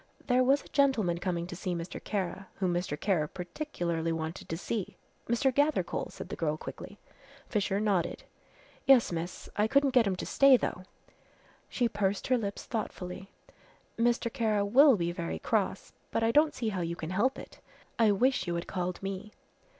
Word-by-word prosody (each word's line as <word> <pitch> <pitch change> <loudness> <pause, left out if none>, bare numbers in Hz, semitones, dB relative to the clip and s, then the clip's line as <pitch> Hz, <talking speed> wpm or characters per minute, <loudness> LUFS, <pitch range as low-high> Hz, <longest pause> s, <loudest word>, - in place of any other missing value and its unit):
"There 250 -1 +3
was 275 +3 +3
a - - -15
gentleman 230 -12 +2
coming 175 -2 -2
to 175 - -7
see 180 0 -3
Mr. 170 +1 -6
Kara, 190 -1 -3
whom 185 -2 0
Mr. 175 -4 -2
Kara 175 -7 +1
particularly 175 - -3
wanted 160 +1 -4
to 165 - -2
see." 200 +2 -4 0.3
"Mr. 255 +3 +2
Gathercole," 290 +3 +1
said - - -9
the - - -4
girl 155 -2 -1
quickly. - - -9 0.5
Fisher 200 -2 0
nodded. 200 -5 0 0.6
"Yes, 265 -7 +6
miss, 170 +1 -5
I 210 +1 +3
couldn't 275 +3 +3
get 245 -4 +4
him 190 - 0
to - - -5
stay 275 -2 +6
though." 185 -5 -4 0.8
She 245 - +1
pursed 200 -2 -1
her 255 - +4
lips 200 -2 -4
thoughtfully. 195 -4 -5 0.7
"Mr. 235 0 +1
Kara 215 -5 +1
will 265 +6 +7
be 170 -1 -1
very 80 - -4
cross, - - -1 0.2
but - - 0
I 225 - +3
don't 300 +4 +4
see 230 -3 -1
how 190 -4 -2
you 170 0 -2
can 165 0 -6
help 225 +8 +1
it. - - -11 0.4
I 225 -2 +5
wish 240 -1 +2
you 170 - -1
had 170 - -3
called 180 0 -3
me." 195 +2 -5
195 Hz, 180 wpm, -30 LUFS, 175-240 Hz, 0.8 s, will